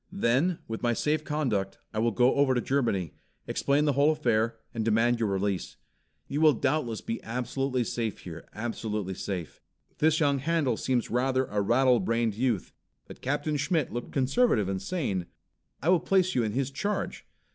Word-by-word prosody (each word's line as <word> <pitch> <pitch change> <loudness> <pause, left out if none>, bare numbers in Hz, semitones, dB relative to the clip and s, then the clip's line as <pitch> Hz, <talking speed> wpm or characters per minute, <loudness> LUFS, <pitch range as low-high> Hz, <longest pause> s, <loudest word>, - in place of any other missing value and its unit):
Then, 170 0 +1
with 115 0 -5
my 120 0 +2
safe 150 +5 0
conduct, 125 -11 -1 0.2
I 110 - -1
will 115 +2 +3
go 125 +3 +3
over 140 -2 +3
to - - +2
Germany, 115 - 0 0.3
explain 145 +2 +1
the 145 - +2
whole 140 +3 +4
affair, 115 -6 +1 0.2
and 115 -2 -2
demand 115 +2 +2
your 110 -3 +1
release. 100 -1 -2 0.5
You 145 +2 -2
will 155 -2 +7
doubtless 120 -3 -1
be 115 - -4
absolutely 125 +2 -1
safe 115 -2 -3
here, 85 -2 -9
absolutely 105 -3 -3
safe. 90 -3 -5 0.4
This 155 0 +3
young 140 -3 +2
Handel 145 -4 +1
seems 125 +1 -1
rather 130 +2 +1
a 105 -4 -1
rattle 125 +4 +4
brained 115 -1 0
youth, 115 -3 -1 0.3
but - - -12
Captain 145 +3 -1
Schmitt 145 0 0
looked 120 0 -5
conservative 130 - +2
and 95 -1 -2
sane. 100 - -2 0.6
I 160 - +2
will 180 -1 +5
place 185 +1 +2
you 125 - +2
in 110 -2 -1
his 135 +1 -1
Charge. 205 +9 -3
125 Hz, 175 wpm, -28 LUFS, 110-145 Hz, 0.6 s, will